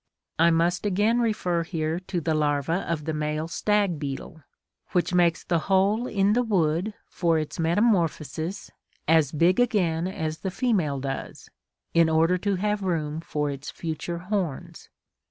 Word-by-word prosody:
(41) 165 - +6
I - - +6
must 175 +2 +1
again 210 +5 +2
refer 195 -7 0
here 160 0 -2
to 185 -1 -3
the 160 0 -1
larva 150 +3 0
of 155 -3 -2
the 160 - -2
male 155 +1 -2
stag 200 -1 +1
beetle, 145 +3 -6 0.5
which 180 0 +1
makes 170 -2 +3
the 170 -1 +1
hole 200 +5 +3
in 200 -2 +2
the 245 - +3
wood 190 -2 0
for 170 -3 +1
its 155 +1 -4
metamorphosis 170 -1 0 0.4
as 160 -3 +4
big 170 +6 +3
again 180 -9 +1
as 160 -4 -4
the 190 - -3
female 185 - 0
does, 135 0 -6 0.4
in 165 -1 +4
order 165 +3 +3
to 200 +1 0
have 210 +2 -1
room 160 -5 -1
for 150 -3 -2
its 140 +1 -7
future 170 +1 -4
horns. 180 -5 -4
170 Hz, 155 wpm, -26 LUFS, 155-195 Hz, 0.5 s, 41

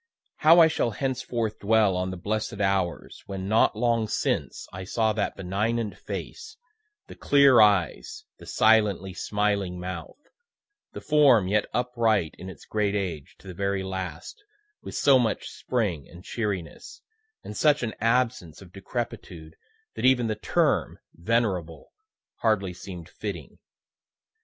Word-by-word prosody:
How 165 +3 +6
I 165 - +8
shall 150 - 0
henceforth 120 -2 -3
dwell 105 -2 +3
on 90 +1 -1
the 95 - -6
blessed 105 +2 -3
hours 95 -3 -1
when, 95 -1 -5
not 110 +1 +3
long 115 0 +1
since, - - -2
I 95 +1 -6
saw 110 +3 0
that 105 -1 -2
benignant 105 +4 -2
face, 445 -1 -8 0.5
the - - -11
clear 140 -4 +5
eyes, 105 - +1
the - - -13
silently 105 -4 +2
smiling 100 -2 -1
mouth, 90 -2 -7 0.8
the - - -7
form 140 -10 +4
yet 105 +2 +1
upright 115 -8 0
in 95 - -8
its 95 - -12
great 105 -1 -1
age 90 -8 -4
to - - -17
the 95 - -7
very 100 +1 -2
last, 95 - -6 0.4
with - - -8
so 135 -2 +5
much 115 -3 -1
spring 100 - -3
and 85 +1 -13
cheeriness, 100 -8 -5 0.4
and 105 - -8
such 150 +2 +3
an 110 -2 -2
absence 115 - 0
of 90 -2 -15
decrepitude, 95 -6 -6 0.4
that - - -7
even 130 -2 +4
the 110 - 0
term 105 - 0 0.2
venerable 90 -4 -2 0.5
hardly 100 -5 0
seem'd 90 -2 -9
fitting. 95 -8 -7
105 Hz, 140 wpm, -26 LUFS, 95-115 Hz, 0.8 s, I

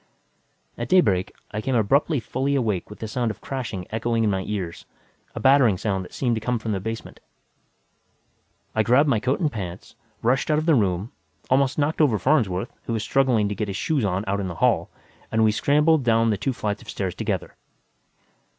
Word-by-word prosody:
At - - -4
daybreak, 100 - +3 0.2
I 110 +1 -3
came 130 +3 -1
abruptly 135 +7 +2
fully 135 +4 -1
awake 110 -9 -1
with 105 - -10
the 110 - -5
sound 120 +2 -1
of 110 -2 -6
crashing 115 -9 -5
echoing 115 +1 0
in 105 - +2
my 95 -1 -1
ears, 95 -5 -4 0.5
a - - -4
battering 130 -7 +5
sound 95 -1 -1
that - - -12
seemed 125 -3 0
to 110 - -3
come 125 +2 0
from 110 0 -4
the 100 - -1
basement. 110 +4 -6 1.5
I 110 - +2
grabbed 125 +7 +4
my 125 -6 +2
coat 130 +5 0
and 155 -5 +1
pants, 95 -4 -7 0.3
rushed 130 +6 +1
out 150 - +3
of 155 - -1
the 165 - +4
room, 100 -3 +1 0.4
almost 135 0 +3
knocked 150 +2 +1
over 130 -8 +4
Farnsworth, 115 -6 +1
who 115 - -2
was 110 -1 -1
struggling 125 -5 +2
to 105 - -2
get 105 +1 -3
his 95 -1 -4
shoes 150 -6 0
on 95 -1 0
out 100 +1 -1
in 95 - -2
the 90 - -5
hall, - - +2 0.4
and 110 0 +2
we 110 - +5
scrambled 150 +7 +3
down 115 -1 +3
the - - +2
two 135 +7 -1
flights 105 -4 -3
of - - -13
stairs 95 -3 -3
together. - - -3
115 Hz, 205 wpm, -24 LUFS, 100-135 Hz, 1.5 s, battering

